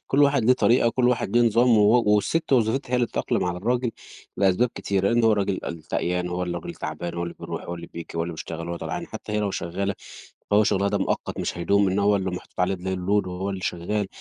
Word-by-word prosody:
كلّ 140 +2 +3
واحد 140 -4 +3
ليه 125 - +6
طريقة 120 -1 +3
و - - 0
كلّ 125 -1 +2
واحد 120 -3 0
ليه 120 - +6
نظام 115 0 +4
و 110 +4 +5
والست 120 +10 +2
وظيفتها 120 +1 +2
هي - - +3
اللي 120 -1 +2
تتأقلم - - -1
على 90 0 -2
الراجل، 120 +4 0 0.5
لأسباب 100 +5 +3
كتيرة، 100 -1 0
لإن 120 +1 +2
هو 110 - +5
الراجل 100 -2 0
الشقيان 90 +2 -2
هو 90 +1 -2
الراجل 85 -1 -4
تعبان، 80 +3 -5
هو 85 - -3
اللي 85 0 -5
بيروح - - -5
هو 85 - -5
اللي 85 0 -8
بييجي 85 -1 -9
هواللي 85 +1 -2
بيشتغل، 85 +1 -6
هو 85 - -3
طلعان، - - -5
حتّى 105 - -8
هي 105 - +1
لو 100 - 0
شغالة، 95 +3 -2 0.6
فهو 105 +1 +5
شغلها 100 0 +2
ده 100 0 0
مؤقت 95 - -2
مش - - -3
هيدوم، 100 +3 +3
إنما 95 +2 0
هو 100 0 +4
اللي 95 -1 -2
محطوط 90 0 -7
عليه 95 +1 +2
ال 90 - -10 0.2
الload 100 +2 +1
وهو 90 +2 -3
اللي 95 -1 -4
شغال، 100 +4 -2
100 Hz, 235 wpm, -24 LUFS, 90-115 Hz, 0.6 s, ليه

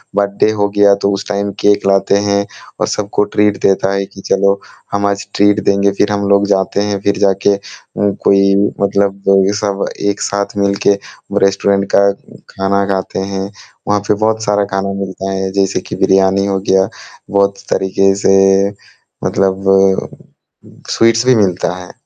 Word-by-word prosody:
Birthday 100 +1 +1
हो 105 -1 0
गया 100 -1 +5
तो, 100 0 -1
उस 100 - -4
टाइम 100 0 -2
केक 105 -1 +2
लाते 100 0 +2
हैं 100 0 +1 0.3
और - - 0
सबको 105 0 -1
ट्रीट 105 -1 +2
देता 95 0 +2
है 100 0 -1
कि 95 - -14
चलो 100 0 +2 0.3
हम 100 0 -1
आज 100 0 -1
ट्रीट 105 0 +3
देंगे, 100 0 +2
फिर 100 +1 0
हम 100 -1 -1
लोग 100 0 +3
जाते 95 0 0
हैं, 100 -1 -2
फिर 100 - 0
जाके 100 +1 +2
उम, 100 0 -4
कोई 100 0 +4 0.3
मतलब 100 0 +1
जो 100 0 +5
कि 100 - 0
सब 100 -1 -2 0.2
एक 100 - -3
साथ 100 +2 -2
मिल 100 -1 +1
के - - +6 0.4
वो - - -2
रेस्टोरेंट 100 0 +1
का 100 0 +5 0.4
खाना 100 +1 -1
खाते 95 0 -3
हैं। 95 0 -3 0.4
वहाँ 105 0 +2
पे - - +3
बहुत 110 +1 -1
सारा 105 -1 +1
खाना 100 0 -2
मिलता 95 0 -5
है 95 0 -2
जैसे 100 0 0
कि - - -7
बिरयानी 95 0 +2
हो 100 -1 -1
गया 95 0 +3 0.4
बहुत 100 0 +1
तरीके 95 +1 +1
से 95 - +5 0.9
मतलब 95 0 0
अ, 95 0 +3 0.8
स्वीट्स 115 +1 +2
भी 130 - +5
मिलता 95 -5 +1
है 90 -1 -10
100 Hz, 175 wpm, -14 LUFS, 95-100 Hz, 0.9 s, के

